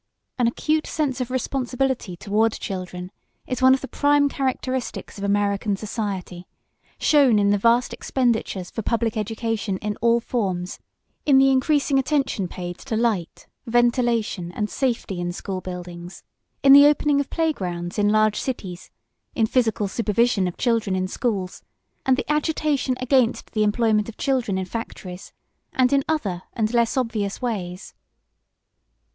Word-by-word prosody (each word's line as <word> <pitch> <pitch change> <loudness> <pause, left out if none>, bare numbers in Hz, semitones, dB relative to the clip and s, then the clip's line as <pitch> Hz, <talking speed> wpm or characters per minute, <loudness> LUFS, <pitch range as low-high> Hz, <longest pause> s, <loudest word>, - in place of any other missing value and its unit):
An 240 - +3
acute 310 +6 0
sense 275 -5 -1
of 250 - -3
responsibility 255 -5 -2
toward 215 +4 +1
children 180 -1 -6 0.3
is 255 - -4
one 260 0 +7
of 265 - -6
the 270 - -5
prime 285 0 +3
characteristics 260 -5 -3
of - - -6
American 200 0 +1
society, 195 -4 -5 0.5
shown 275 -7 +4
in 200 0 +3
the 205 - +3
vast 235 +3 +3
expenditures 225 -7 -1
for 225 - -4
public 230 0 0
education 220 -2 -2
in 210 +1 -3
all 235 0 +3
forms, 190 -7 -3 0.5
in 275 -2 +6
the 270 0 +6
increasing 275 +1 +2
attention 270 -8 0
paid 175 0 -7
to 220 - -3
light, 220 -7 -1 0.2
ventilation, 235 -6 +1
and 210 +2 -2
safety 235 -8 -1
in 175 0 -2
school 185 +1 -5
buildings, 175 -1 -8 0.4
in 275 0 +8
the 285 +1 +10
opening 295 -1 +3
of 285 - -2
play 325 -2 +1
grounds 175 -2 -4
in 205 0 +3
large 215 0 +3
cities, 190 -9 -5 0.5
in 225 - +3
physical 220 -3 +1
supervision 215 -1 +1
of 175 - -6
children 230 -5 +1
in 185 0 -1
schools, 195 -4 -3 0.5
and 260 -1 +4
the - - -2
agitation 300 -3 0
against 255 -2 +1
the 215 - -1
employment 215 0 +2
of 225 - -11
children 255 -8 0
in 190 - -2
factories, 185 -3 -7 0.4
and 255 0 +3
in 275 -1 +3
other 200 - -1
and 220 0 -1
less 235 +1 +2
obvious 220 -5 -1
ways. 190 -7 -4
225 Hz, 150 wpm, -23 LUFS, 195-260 Hz, 0.5 s, the